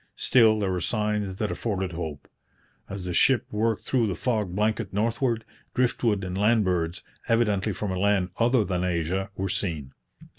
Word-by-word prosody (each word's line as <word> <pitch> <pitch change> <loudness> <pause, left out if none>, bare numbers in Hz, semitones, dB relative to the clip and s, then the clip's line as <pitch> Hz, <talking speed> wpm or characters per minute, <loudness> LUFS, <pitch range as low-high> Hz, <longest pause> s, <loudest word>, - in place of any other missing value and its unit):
Still, 110 -4 +4
there 100 -2 0
were 90 -1 -1
signs 105 -1 -1
that 105 +1 -2
afforded 95 -5 -2
hope. 80 -4 -6 0.6
As 100 -2 -6
the 90 - -3
ship 125 +6 +4
worked 110 +1 0
through 120 -4 +1
the 95 - -2
fog 105 -3 -1
blanket 110 +1 0
northward, 115 +2 0 0.3
drift 125 -1 +1
wood 105 -4 +2
and 90 -1 -4
land 105 +2 +3
birds, 85 -2 -1 0.2
evidently 105 -3 +2
from 100 +1 -3
a 95 - -2
land 100 -2 +2
other 120 -1 +3
than 90 -1 -1
Asia, 90 +2 -1
were 95 0 -2
seen. 80 -10 -3
100 Hz, 175 wpm, -26 LUFS, 90-110 Hz, 0.6 s, Still